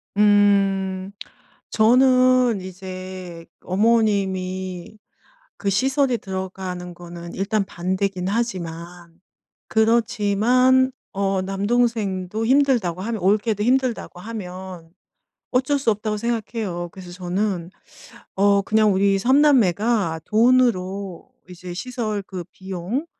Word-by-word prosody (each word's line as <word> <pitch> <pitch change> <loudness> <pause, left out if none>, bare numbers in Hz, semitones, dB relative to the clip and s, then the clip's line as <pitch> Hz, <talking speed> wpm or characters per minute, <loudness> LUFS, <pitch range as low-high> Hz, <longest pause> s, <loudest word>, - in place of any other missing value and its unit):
음. 195 -2 +2 0.6
저는 255 -1 +4
이제 185 -2 -8 0.2
어머님이 190 -3 0 0.6
그 200 - -1
시설에 260 +5 +1
들어가는 185 -2 -6
거는 170 0 -10
일단 200 +1 0
반대긴 185 0 -2
하지만, 175 -5 -4 0.5
그렇지만 235 +3 +3 0.2
어 195 -1 0
남동생도 205 0 -1
힘들다고 245 -10 +2
하면 225 +1 -3
올케도 210 +2 +1
힘들다고 250 -7 0
하면, 185 -5 -8 0.6
어쩔 260 +3 +1
수 250 -4 +2
없다고 210 0 -2
생각해요. 215 -6 -3
그래서 180 -2 -11
저는 180 0 -2 0.7
어 200 0 +4
그냥 215 0 +3
우리 195 +1 +2
삼남매가 225 - +3
돈으로 200 -6 +1 0.2
이제 180 0 -8
시설 215 -1 -3
그 185 -2 -7
비용, 190 - -4
200 Hz, 220 characters per minute, -22 LUFS, 185-230 Hz, 0.7 s, 저는